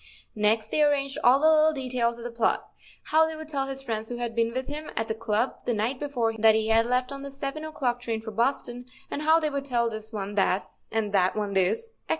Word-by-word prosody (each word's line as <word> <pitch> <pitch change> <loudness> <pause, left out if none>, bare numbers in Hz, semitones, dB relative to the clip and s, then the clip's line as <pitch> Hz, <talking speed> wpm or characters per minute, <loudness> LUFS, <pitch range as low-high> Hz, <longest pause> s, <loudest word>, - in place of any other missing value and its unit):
Next 215 +1 +1
they 305 - +2
arranged 280 -2 +2
all 255 +3 +6
the 310 - +4
little 315 0 +5
details 250 -4 -1
of 235 - -9
the 240 - -5
plot—how 305 +6 0
they 320 - -4
would 315 0 -8
tell 275 -3 -2
his 270 0 -5
friends 220 -3 -3
who 245 - -4
had 240 -1 -3
been 230 0 +1
with 260 +2 -3
him 300 +2 -5
at 225 0 0
the - - -1
club 225 +2 -1
the 240 - 0
night 235 +5 -1
before 250 -6 -1
that 220 0 +6
he 220 0 0
had 225 +1 +4
left 250 +1 0
on 275 0 -6
the 280 - -6
seven 275 +2 -5
o'clock 255 -6 -2
train 230 -2 -2
for 220 0 -7
Boston, 245 +1 -1 0.2
and 290 - -3
how 315 +2 +5
they 305 -2 -1
would 280 -1 -2
tell 235 -3 +1
this 220 0 -5
one 205 -2 -4
that, 195 -1 +1 0.2
and 220 -2 -1
that 185 -2 +3
one 205 -2 -2
this, 195 - +1
etc. 460 - -35
240 Hz, 245 wpm, -26 LUFS, 220-280 Hz, 0.2 s, all